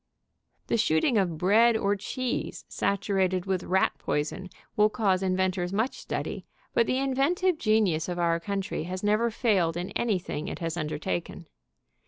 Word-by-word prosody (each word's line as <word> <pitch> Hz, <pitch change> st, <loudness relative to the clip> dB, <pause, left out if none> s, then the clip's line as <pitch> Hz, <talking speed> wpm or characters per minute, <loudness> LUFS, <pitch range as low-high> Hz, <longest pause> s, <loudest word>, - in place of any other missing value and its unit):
The -, -, 0 dB
shooting 210 Hz, -, +3 dB
of 175 Hz, -5 st, 0 dB
bread 220 Hz, +7 st, +4 dB
or 200 Hz, -1 st, +1 dB
cheese 255 Hz, +5 st, -4 dB
saturated 190 Hz, -2 st, 0 dB
with 190 Hz, -2 st, 0 dB
rat 190 Hz, +1 st, +2 dB
poison 150 Hz, +5 st, -2 dB, 0.3 s
will 210 Hz, 0 st, +4 dB
cause 195 Hz, -5 st, +1 dB
inventors 185 Hz, -1 st, 0 dB
much 220 Hz, +6 st, -1 dB
study, -, -, -4 dB, 0.3 s
but 235 Hz, -, +3 dB
the 255 Hz, -, +1 dB
in 270 Hz, 0 st, 0 dB
ventive 345 Hz, +6 st, +1 dB
genius 205 Hz, -7 st, +2 dB
of 175 Hz, -, -3 dB
our 170 Hz, -1 st, +1 dB
country 195 Hz, -2 st, -3 dB
has 185 Hz, +2 st, -5 dB
never 215 Hz, +3 st, +2 dB
failed 195 Hz, -8 st, +1 dB
in 175 Hz, +1 st, -4 dB
anything 185 Hz, -8 st, -2 dB
it -, -, -4 dB
has 165 Hz, -1 st, -3 dB
undertaken. 150 Hz, -, -3 dB
195 Hz, 155 wpm, -27 LUFS, 175-220 Hz, 0.3 s, bread